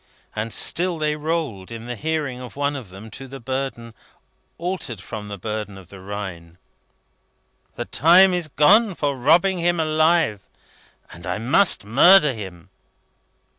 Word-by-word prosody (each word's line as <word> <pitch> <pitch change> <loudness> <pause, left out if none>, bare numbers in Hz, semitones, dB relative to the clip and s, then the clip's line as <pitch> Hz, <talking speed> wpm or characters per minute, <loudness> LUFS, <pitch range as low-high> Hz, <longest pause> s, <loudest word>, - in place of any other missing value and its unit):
And 110 +1 -3
still 175 +7 +2
they 150 -1 -1
rolled, 150 - -3
in 115 0 -8
the 120 0 -5
hearing 150 -1 -3
of 125 -1 -10
one 145 +1 -1
of 125 -8 -8
them, 100 +4 -12
to 135 0 -8
the 135 +1 -9
burden, 130 -2 -5 0.6
altered 170 - -4
from 105 -1 -8
the 100 -1 -7
burden 105 0 -5
of 95 -2 -14
the 100 - -12
Rhine: 95 -4 -7 1.2
"The - - -4
time 180 +5 +5
is 175 -3 -1
gone 195 +8 +4
for 145 -3 -1
robbing 170 +8 +3
him 175 0 +1
alive, 155 - +2 0.7
and 85 -1 -11
I 90 - -2
must 125 - +2
murder 150 - +6
him." 95 -6 -10
135 Hz, 150 wpm, -22 LUFS, 105-160 Hz, 1.2 s, murder